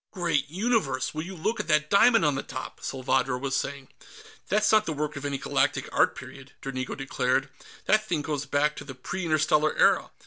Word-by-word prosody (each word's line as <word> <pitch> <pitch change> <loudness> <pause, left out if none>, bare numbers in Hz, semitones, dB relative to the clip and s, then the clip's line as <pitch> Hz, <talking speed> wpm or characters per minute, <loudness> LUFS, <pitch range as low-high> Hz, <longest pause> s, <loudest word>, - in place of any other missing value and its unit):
"Great 170 -7 -1
Universe! 185 - 0
Will 155 - -3
you 185 +4 -7
look 215 +7 -2
at 210 - -3
that 150 -1 +2
diamond 225 -1 +5
on 150 - +3
the 135 - -2
top!" - - -8
Salvadro 130 -1 -1
was 135 +1 -2
saying. 140 -1 -3 0.6
"That's 210 +2 +3
not 215 -1 +4
the 160 - -1
work 150 +1 -3
of 140 0 -6
any 140 -1 -1
Galactic - - 0
art - - +3
period," 135 -1 -11
Dranigo 130 -1 -4
declared. 135 0 0 0.4
"That 215 0 +3
thing 160 -6 -1
goes 145 -2 -3
back 145 +2 +1
to - - -6
the 130 -3 -9
Pre 175 +8 -5
Interstellar 155 -1 +2
Era." - - +4
150 Hz, 200 wpm, -27 LUFS, 135-175 Hz, 0.6 s, diamond